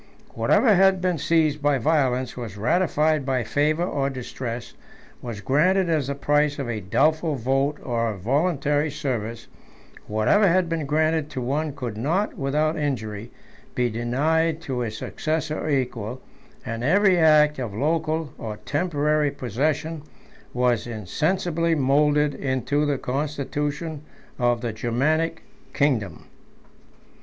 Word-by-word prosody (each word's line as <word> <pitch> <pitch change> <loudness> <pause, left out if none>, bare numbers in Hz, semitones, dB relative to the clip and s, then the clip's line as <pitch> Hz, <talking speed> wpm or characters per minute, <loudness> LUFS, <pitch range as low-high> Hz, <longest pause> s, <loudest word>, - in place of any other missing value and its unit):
Whatever 225 -5 +3
had 190 0 +4
been 180 -3 0
seized 155 -1 +2
by 145 -1 +2
violence, 130 -3 +1
was 115 -5 -7
ratified 155 - +1
by 130 -2 0
favor 150 +8 +1
or 140 -6 -1
distress, 125 -2 -6 0.5
was 115 -4 -6
granted 175 - +2
as 150 -5 +1
the 140 - -2
price 145 +1 +1
of 135 -3 -3
a 115 -2 -2
doubtful 155 - +1
vote 135 +4 0
or 115 -2 -1
a 105 - -5
voluntary 145 - +1
service; 115 -6 -4 0.6
whatever 110 - +3
had 180 0 +3
been 165 -3 -2
granted 155 0 +1
to 130 - -5
one 140 +4 -2
could 120 -7 -5
not, 165 - 0
without 155 +1 0
injury, 115 -6 -3 0.5
be 125 -1 +1
denied 155 +8 0
to 135 -6 -3
his 110 -3 -3
successor 155 +3 -2
or - - -3
equal; 125 -4 -2 0.5
and 115 +1 -4
every 190 +5 +4
act 150 -2 +5
of 120 -5 -3
local 155 +4 -1
or 110 -2 -5
temporary 150 -1 +1
possession 145 +5 -2 0.5
was 120 -2 +1
insensibly 165 - 0
moulded 145 +1 +3
into 135 +2 -1
the 145 -2 0
constitution 145 +3 -3 0.4
of 120 -1 +2
the 120 -3 -3
Germanic 155 +9 0 0.3
kingdom. 120 - 0
145 Hz, 130 wpm, -24 LUFS, 125-155 Hz, 0.6 s, act